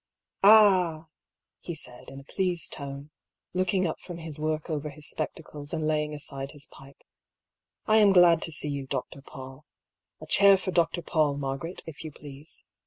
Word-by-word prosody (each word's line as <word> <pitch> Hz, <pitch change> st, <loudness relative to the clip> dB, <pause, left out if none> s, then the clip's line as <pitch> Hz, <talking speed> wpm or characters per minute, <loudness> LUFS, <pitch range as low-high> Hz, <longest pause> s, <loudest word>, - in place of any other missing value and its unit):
" -, -, -64 dB
Ah! 185 Hz, -7 st, +6 dB, 0.2 s
" -, -, -63 dB
he 170 Hz, -, -6 dB
said, 125 Hz, -5 st, -12 dB
in 135 Hz, -, -9 dB
a -, -, -13 dB
pleased 180 Hz, +2 st, -2 dB
tone, 140 Hz, +1 st, -8 dB, 0.4 s
looking 185 Hz, +1 st, +1 dB
up 160 Hz, -, -2 dB
from 175 Hz, -2 st, -8 dB
his 160 Hz, -3 st, -8 dB
work 155 Hz, 0 st, -2 dB
over 150 Hz, -2 st, -3 dB
his 150 Hz, 0 st, -11 dB
spectacles 150 Hz, -2 st, -6 dB
and 155 Hz, -, -1 dB
laying 150 Hz, -1 st, 0 dB
aside 140 Hz, -2 st, -6 dB
his 145 Hz, -1 st, -12 dB
pipe, 135 Hz, 0 st, -16 dB, 0.4 s
" -, -, -64 dB, 0.3 s
I 220 Hz, -, +4 dB
am 210 Hz, -2 st, +6 dB
glad 175 Hz, -3 st, +6 dB
to 165 Hz, -, -4 dB
see 150 Hz, 0 st, -4 dB
you. 140 Hz, -2 st, -4 dB
Dr. 135 Hz, -, -4 dB
Paull. 135 Hz, +1 st, -11 dB, 0.6 s
A -, -, -9 dB
chair 200 Hz, -1 st, +6 dB
for 185 Hz, 0 st, -3 dB
Dr. 175 Hz, 0 st, +1 dB
Paull, 150 Hz, -3 st, +1 dB
Margaret, 140 Hz, +5 st, -4 dB
if 160 Hz, -1 st, -9 dB
you 155 Hz, -, -6 dB
please. 145 Hz, +1 st, -12 dB
155 Hz, 185 wpm, -27 LUFS, 145-175 Hz, 0.6 s, Ah